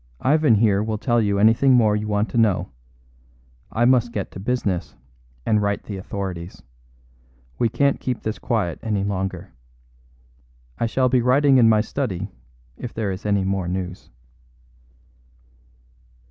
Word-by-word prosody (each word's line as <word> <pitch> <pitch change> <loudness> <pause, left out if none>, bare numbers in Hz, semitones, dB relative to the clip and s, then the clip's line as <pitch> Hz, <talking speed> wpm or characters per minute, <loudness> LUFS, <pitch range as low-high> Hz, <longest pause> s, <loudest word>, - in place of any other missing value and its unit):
Ivan 150 -4 +4
here 105 -2 +3
will 110 0 -2
tell 120 +1 +1
you 100 -2 0
anything 115 +6 +4
more 110 -4 +4
you 105 0 -3
want 105 +1 0
to - - -4
know; 95 -7 +1 1.0
I 120 +2 +1
must 120 -2 +3
get 100 -4 -4
to - - -9
business 100 -5 -2 0.5
and 105 -1 +2
write 100 0 -1
to - - -23
the 100 - -4
authorities. 95 -2 -6 1.0
We 115 - +2
can't 140 +4 +1
keep 125 -3 -3
this 110 0 -3
quiet 105 -9 -1
any 105 -3 -1
longer. 95 -2 -4 1.3
I 115 - +1
shall 130 +3 +1
be 125 0 +2
writing 135 +2 +4
in 115 -2 +6
my 110 -1 +4
study 110 -6 -4 0.5
if 120 - -7
there 110 -3 -1
is 95 +3 -6
any 100 -2 +2
more 95 -1 -1
news." 90 0 -5
105 Hz, 150 wpm, -22 LUFS, 95-120 Hz, 1.3 s, in